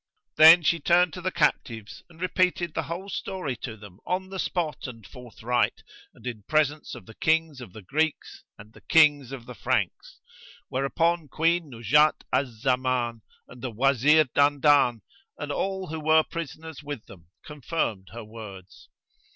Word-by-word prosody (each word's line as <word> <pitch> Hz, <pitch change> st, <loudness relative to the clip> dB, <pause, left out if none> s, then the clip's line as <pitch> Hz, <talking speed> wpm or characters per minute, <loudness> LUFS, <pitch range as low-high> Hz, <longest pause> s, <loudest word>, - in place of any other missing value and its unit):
Then 165 Hz, +2 st, +9 dB
she 170 Hz, +2 st, +2 dB
turned 175 Hz, +2 st, +3 dB
to 180 Hz, -, -7 dB
the 185 Hz, -, -1 dB
captives 115 Hz, -8 st, -1 dB
and 165 Hz, -1 st, -18 dB
repeated 180 Hz, -2 st, 0 dB
the -, -, -1 dB
whole 175 Hz, +4 st, -5 dB
story 185 Hz, -9 st, -4 dB
to 110 Hz, -1 st, -7 dB
them 100 Hz, -2 st, -14 dB
on 185 Hz, +1 st, -3 dB
the 190 Hz, 0 st, -6 dB
spot 165 Hz, -7 st, -2 dB
and 115 Hz, -5 st, -11 dB
forthright, 125 Hz, 0 st, -3 dB, 0.3 s
and 115 Hz, -, -18 dB
in 120 Hz, -4 st, -5 dB
presence 155 Hz, -1 st, 0 dB
of -, -, -12 dB
the 115 Hz, -, -13 dB
Kings 160 Hz, -1 st, 0 dB
of 115 Hz, -7 st, -10 dB
the 105 Hz, +2 st, -12 dB
Greeks 155 Hz, -, -2 dB
and 105 Hz, +2 st, -15 dB
the -, -, -17 dB
Kings 145 Hz, -5 st, +4 dB
of 130 Hz, -4 st, -8 dB
the 125 Hz, -, -9 dB
Franks; -, -, -2 dB, 0.5 s
whereupon 165 Hz, +5 st, 0 dB
Queen 165 Hz, +3 st, 0 dB
Nuzhat 140 Hz, +6 st, +2 dB
al 140 Hz, -, +2 dB
Zaman 125 Hz, 0 st, -1 dB, 0.3 s
and 125 Hz, -, -14 dB
the 130 Hz, -, -3 dB
Wazir 135 Hz, +6 st, +4 dB
Dandan 140 Hz, -4 st, +3 dB, 0.3 s
and 145 Hz, -1 st, -5 dB
all 190 Hz, +5 st, -2 dB
who 160 Hz, 0 st, -4 dB
were 155 Hz, +1 st, +4 dB
prisoners 160 Hz, -1 st, -7 dB
with 145 Hz, -6 st, -7 dB
them 85 Hz, -4 st, -15 dB, 0.2 s
confirmed 145 Hz, -, -3 dB
her 115 Hz, 0 st, -8 dB
words. 105 Hz, -4 st, -12 dB
145 Hz, 160 wpm, -26 LUFS, 120-160 Hz, 0.5 s, Then